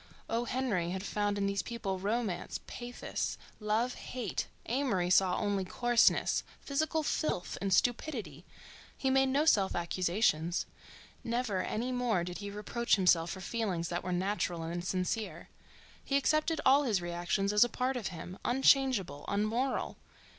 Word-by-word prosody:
O. 230 Hz, +1 st, -1 dB
Henry 230 Hz, -9 st, -1 dB
had 190 Hz, +1 st, -3 dB
found 205 Hz, 0 st, -1 dB
in 200 Hz, -, 0 dB
these 200 Hz, 0 st, 0 dB
people 210 Hz, -6 st, -4 dB
romance, 205 Hz, -2 st, -2 dB
pathos, 245 Hz, 0 st, -4 dB, 0.2 s
love, 220 Hz, +4 st, 0 dB
hate—Amory 235 Hz, -3 st, -2 dB
saw 185 Hz, -1 st, +4 dB
only 200 Hz, -2 st, 0 dB
coarseness, 240 Hz, +5 st, +3 dB, 0.2 s
physical 310 Hz, +3 st, -1 dB
filth, 290 Hz, -, -1 dB
and 195 Hz, -1 st, -1 dB
stupidity. 215 Hz, -, 0 dB, 0.5 s
He 265 Hz, -, +1 dB
made 270 Hz, 0 st, +4 dB
no 285 Hz, +3 st, +2 dB
self 200 Hz, -11 st, +3 dB
accusations: 175 Hz, -1 st, +1 dB, 0.6 s
never 230 Hz, -5 st, -1 dB
any 235 Hz, +6 st, -2 dB
more 245 Hz, -8 st, +1 dB
did 180 Hz, 0 st, -6 dB
he 200 Hz, 0 st, -5 dB
reproach 210 Hz, +4 st, 0 dB
himself 175 Hz, -4 st, +3 dB
for 190 Hz, -, -5 dB
feelings 185 Hz, -5 st, -2 dB
that 175 Hz, 0 st, -2 dB
were 185 Hz, -, -3 dB
natural 180 Hz, -2 st, -1 dB
and 170 Hz, +2 st, -4 dB
sincere. 185 Hz, -1 st, -2 dB, 0.5 s
He 275 Hz, -, +1 dB
accepted 310 Hz, +3 st, +1 dB
all 275 Hz, +2 st, +6 dB
his 225 Hz, -9 st, +1 dB
reactions 175 Hz, +3 st, -1 dB
as 210 Hz, -, +7 dB
a 240 Hz, -, +1 dB
part 255 Hz, +3 st, -1 dB
of 235 Hz, -5 st, -2 dB
him, 180 Hz, +1 st, -8 dB
unchangeable, 255 Hz, -, +3 dB
unmoral. 220 Hz, +6 st, -1 dB
205 Hz, 145 wpm, -32 LUFS, 180-245 Hz, 0.6 s, as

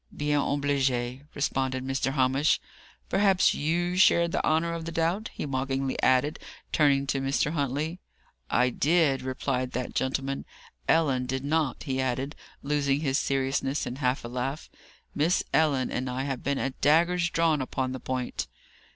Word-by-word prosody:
"Bien 145 Hz, 0 st, +1 dB
obligé," 135 Hz, -2 st, 0 dB
responded 130 Hz, -2 st, -1 dB
Mr. 135 Hz, 0 st, -1 dB
Hamish. 135 Hz, +2 st, +2 dB, 0.5 s
"Perhaps 195 Hz, -2 st, +3 dB
you 175 Hz, +4 st, 0 dB
shared 170 Hz, -2 st, +4 dB
the -, -, -1 dB
honour 165 Hz, +2 st, +1 dB
of 165 Hz, -1 st, -5 dB
the 165 Hz, -, -4 dB
doubt?" 170 Hz, +7 st, 0 dB
he -, -, -4 dB
mockingly 135 Hz, -1 st, -1 dB
added, 130 Hz, +4 st, +2 dB, 0.3 s
turning 140 Hz, -2 st, +3 dB
to 135 Hz, 0 st, -1 dB
Mr. 135 Hz, +2 st, 0 dB
Huntley. 150 Hz, +3 st, -2 dB, 0.5 s
"I 125 Hz, 0 st, +3 dB
did," 150 Hz, -1 st, +2 dB
replied 130 Hz, 0 st, -2 dB
that 125 Hz, 0 st, -3 dB
gentleman. 135 Hz, +1 st, -1 dB, 0.4 s
"Ellen 135 Hz, -6 st, +2 dB
did 130 Hz, +1 st, -2 dB
not," 150 Hz, -3 st, 0 dB
he 130 Hz, -3 st, -1 dB
added, 130 Hz, +3 st, -2 dB, 0.3 s
losing 140 Hz, 0 st, +1 dB
his 135 Hz, -3 st, +1 dB
seriousness 135 Hz, +1 st, 0 dB
in 125 Hz, -, -5 dB
a -, -, -12 dB
half 125 Hz, -2 st, 0 dB
laugh. 125 Hz, +5 st, -4 dB, 0.4 s
"Miss 160 Hz, +5 st, +2 dB
Ellen 145 Hz, -5 st, +2 dB
and 130 Hz, +1 st, -2 dB
I 130 Hz, +1 st, -2 dB
have 135 Hz, -3 st, -3 dB
been 140 Hz, 0 st, -1 dB
at 135 Hz, -1 st, -3 dB
daggers 170 Hz, +3 st, +3 dB
drawn 165 Hz, -4 st, +2 dB
upon 130 Hz, 0 st, -2 dB
the 130 Hz, -, -5 dB
point." 130 Hz, -1 st, -3 dB
140 Hz, 155 wpm, -27 LUFS, 130-155 Hz, 0.5 s, shared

